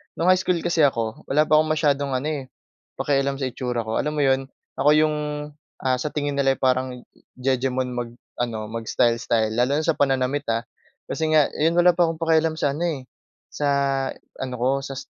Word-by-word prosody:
Noong 170 Hz, +2 st, +1 dB
high 185 Hz, -, +4 dB
school 180 Hz, -3 st, 0 dB
kasi 175 Hz, -1 st, 0 dB
ako, 115 Hz, -7 st, +1 dB
wala 150 Hz, +3 st, +3 dB
pa 155 Hz, 0 st, +4 dB
akong 155 Hz, 0 st, +1 dB
masyadong 145 Hz, -2 st, +1 dB
ano, 130 Hz, +4 st, -2 dB
eh, 145 Hz, -3 st, -3 dB, 0.6 s
pakialam 140 Hz, -1 st, +1 dB
sa 130 Hz, -, -1 dB
itsura 125 Hz, -2 st, -3 dB
ko 110 Hz, 0 st, -2 dB
alam 150 Hz, +1 st, -1 dB
mo 150 Hz, -, +1 dB
'yon. 135 Hz, 0 st, +2 dB, 0.3 s
Ako 145 Hz, +3 st, +5 dB
yung, 155 Hz, 0 st, +3 dB, 0.7 s
ah, 130 Hz, -1 st, +1 dB
sa 140 Hz, -, -2 dB
tingin 145 Hz, -1 st, -2 dB
nila'y 135 Hz, -1 st, +3 dB
parang 130 Hz, -1 st, 0 dB, 0.3 s
jejemon 130 Hz, 0 st, -1 dB
mag-ano, 120 Hz, -2 st, -5 dB
mag-style-style 115 Hz, -1 st, +1 dB
lalo 125 Hz, +3 st, +2 dB
na 155 Hz, -, 0 dB
sa 165 Hz, -, +3 dB
pananamit, 135 Hz, +1 st, +1 dB
ha. 115 Hz, 0 st, 0 dB, 0.5 s
Kasi 160 Hz, 0 st, -1 dB
nga, 150 Hz, -2 st, +4 dB
'yon 165 Hz, +2 st, +2 dB
wala 175 Hz, +1 st, +6 dB
pa 175 Hz, 0 st, +2 dB
akong 165 Hz, -, -2 dB
pakialam 160 Hz, -1 st, +2 dB
sa 145 Hz, -3 st, 0 dB
ano, 165 Hz, +5 st, -1 dB
eh, 145 Hz, -6 st, -3 dB, 0.5 s
sa 145 Hz, -, -2 dB, 0.7 s
ano 130 Hz, -1 st, -4 dB
ko, 125 Hz, +1 st, 0 dB
sa 135 Hz, 0 st, -7 dB
135 Hz, 185 wpm, -23 LUFS, 125-155 Hz, 0.7 s, wala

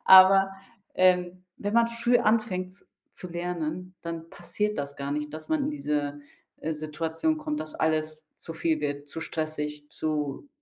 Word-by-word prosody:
Aber, 195 Hz, +1 st, +9 dB, 0.4 s
ähm, 180 Hz, 0 st, +3 dB
wenn 205 Hz, +1 st, -3 dB
man 235 Hz, 0 st, +5 dB
früh 235 Hz, +1 st, +3 dB
anfängt 210 Hz, -5 st, +1 dB
z 200 Hz, -, -14 dB, 0.3 s
zu 180 Hz, -, -8 dB
lernen, 175 Hz, +1 st, -3 dB
dann 165 Hz, -1 st, -5 dB
passiert 210 Hz, +4 st, -2 dB
das 140 Hz, 0 st, -3 dB
gar 140 Hz, 0 st, -4 dB
nicht, 150 Hz, 0 st, -3 dB
dass 155 Hz, 0 st, -8 dB
man 310 Hz, -3 st, +2 dB
in 295 Hz, -, 0 dB
diese, 145 Hz, -, -2 dB, 0.4 s
äh, 160 Hz, -, -1 dB
Situation 160 Hz, -, -1 dB
kommt, 305 Hz, -1 st, -2 dB
dass 155 Hz, -1 st, -7 dB
alles 155 Hz, 0 st, -1 dB
zu 165 Hz, -, -7 dB
viel 160 Hz, -1 st, +1 dB
wird, 145 Hz, 0 st, -3 dB
zu 165 Hz, -, -6 dB
stressig, 150 Hz, -2 st, -3 dB
zu 150 Hz, -, -2 dB
165 Hz, 165 wpm, -28 LUFS, 155-195 Hz, 0.4 s, Aber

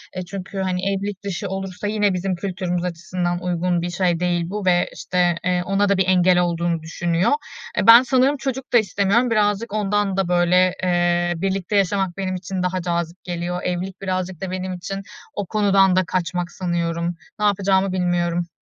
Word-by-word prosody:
eee, 185 Hz, -, -4 dB
çünkü 195 Hz, +1 st, -7 dB
hani, 185 Hz, -1 st, -1 dB
evlilik 200 Hz, 0 st, -4 dB
dışı 200 Hz, 0 st, -3 dB
olursa 195 Hz, +1 st, -4 dB
yine 210 Hz, -2 st, +1 dB
bizim 185 Hz, +1 st, -1 dB
kültürümüz 180 Hz, -1 st, -3 dB
açısından 175 Hz, +1 st, -3 dB
uygun 175 Hz, 0 st, 0 dB
bir 175 Hz, -, -2 dB
şey 175 Hz, -1 st, 0 dB
değil 175 Hz, -1 st, 0 dB
bu 205 Hz, -1 st, -4 dB
ve 175 Hz, -1 st, +3 dB
işte, 180 Hz, -1 st, 0 dB
eee, 180 Hz, -1 st, +1 dB
ona 195 Hz, +1 st, +1 dB
da 200 Hz, -, +3 dB
bir 190 Hz, -1 st, +2 dB
engel 180 Hz, -1 st, +4 dB
olduğunu 170 Hz, -1 st, 0 dB
düşünüyor. 170 Hz, -, 0 dB, 0.5 s
E, -, -, +1 dB
ben 235 Hz, +2 st, +10 dB
sanırım 260 Hz, +3 st, +2 dB
çocuk 265 Hz, -1 st, -4 dB
da 240 Hz, -, +8 dB
istemiyorum, 205 Hz, +4 st, +2 dB
birazcık 210 Hz, 0 st, +1 dB
ondan 205 Hz, -2 st, 0 dB
da 195 Hz, -2 st, +1 dB
böyle, 180 Hz, +1 st, +3 dB
eee, 175 Hz, -1 st, +2 dB
birlikte 195 Hz, +2 st, -2 dB
yaşamak 195 Hz, -2 st, +1 dB
benim 190 Hz, -1 st, -2 dB
için 185 Hz, +1 st, -4 dB
daha 180 Hz, 0 st, -1 dB
cazip 170 Hz, 0 st, -3 dB
geliyor, 175 Hz, 0 st, -3 dB
evlilik 180 Hz, +2 st, -3 dB
birazcık 185 Hz, -2 st, -3 dB
da 190 Hz, -1 st, -4 dB
benim 185 Hz, 0 st, -3 dB
için 195 Hz, +2 st, -5 dB, 0.3 s
o 205 Hz, -, -3 dB
konudan 195 Hz, -2 st, +3 dB
da 185 Hz, -, +2 dB
kaçmak 175 Hz, 0 st, -2 dB
sanıyorum. 170 Hz, -1 st, -2 dB, 0.2 s
Ne 210 Hz, -, +1 dB
yapacağımı 195 Hz, -1 st, +2 dB
bilmiyorum. 175 Hz, -1 st, 0 dB
185 Hz, 175 wpm, -21 LUFS, 175-195 Hz, 0.5 s, ben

